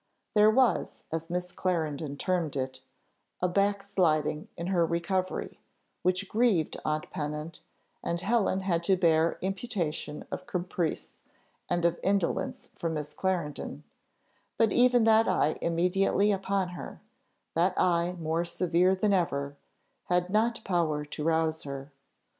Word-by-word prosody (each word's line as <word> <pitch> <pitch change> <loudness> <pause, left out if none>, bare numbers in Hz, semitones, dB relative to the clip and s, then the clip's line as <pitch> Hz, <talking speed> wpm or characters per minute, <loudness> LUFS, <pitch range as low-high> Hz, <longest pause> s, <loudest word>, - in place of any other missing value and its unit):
There 210 0 +6
was, 250 +2 +2
as 165 +1 -3
Miss 180 0 -2
Clarendon 155 -5 -2
termed 170 -3 -1
it, 130 -1 -3 0.6
a 180 - +2
"backsliding 185 -6 +1
in 170 - -4
her 180 -2 +2
recovery," 175 +3 -1 0.4
which 185 +2 +1
grieved 215 -9 +2
aunt 155 0 -2
Pennant, 150 +2 -4 0.4
and 170 - -1
Helen 195 -1 +1
had 175 -3 0
to 190 +1 +3
bear 165 -2 +3
imputation 185 -7 -3
of - - -5
caprice, 175 -2 -3 0.5
and 175 -1 +1
of 170 0 +2
indolence 195 -3 -1
from 165 -1 -3
Miss 150 -1 -4
Clarendon; 175 -6 -2 0.7
but 225 -3 +3
even 245 -1 +5
that 225 0 +5
eye 180 -4 +1
immediately 180 +4 +2
upon 195 -1 0
her, 175 - -8 0.5
that 175 +3 +2
eye 175 0 +2
more 165 0 -1
severe 180 +1 +2
than 200 +2 +2
ever, 140 -6 0 0.5
had 180 0 +1
not 225 +2 +1
power 160 -5 0
to 150 +1 -5
rouse 160 0 +1
her. 140 0 -7
175 Hz, 130 wpm, -29 LUFS, 160-195 Hz, 0.7 s, There